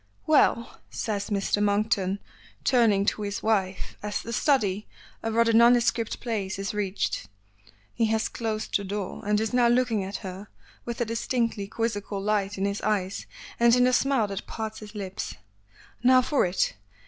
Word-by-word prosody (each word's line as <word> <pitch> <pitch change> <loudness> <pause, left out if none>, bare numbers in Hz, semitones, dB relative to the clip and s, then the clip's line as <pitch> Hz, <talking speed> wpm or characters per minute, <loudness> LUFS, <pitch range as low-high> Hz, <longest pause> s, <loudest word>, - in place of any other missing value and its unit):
"Well," 255 -6 +2
says 205 -2 -3
Mr. 205 0 0
Monkton, 205 -2 +1 0.5
turning 220 -6 +3
to 210 - 0
his 205 0 -3
wife 195 -4 -1
as 210 0 -3
the 230 - -5
study 215 -7 +1 0.3
(a 225 - -2
rather 230 0 +3
nondescript 235 0 +4
place) 205 -6 -3
is 195 +1 -3
reached. 200 - -2 0.7
He 230 -1 +1
has 220 0 +1
closed 220 -2 -3
the 200 - +2
door, 200 -1 -4
and 210 0 +2
is 220 +2 -2
now 245 -1 +4
looking 240 -4 +2
at 195 +1 -5
her 190 +2 -7 0.4
with 235 0 -4
a - - +2
distinctly 230 -2 -1
quizzical 205 -2 -2
light 205 0 0
in 195 - 0
his 200 0 -2
eyes 200 -3 -1 0.3
and 235 0 +6
in 250 - +4
the 255 0 +3
smile 270 -3 +3
that 195 0 -5
parts 220 -1 -5
his 215 0 -11
lips. 195 -2 -5 0.7
"Now 255 +1 +6
for 275 -7 +2
it. 180 - 0
215 Hz, 165 wpm, -26 LUFS, 200-235 Hz, 0.7 s, and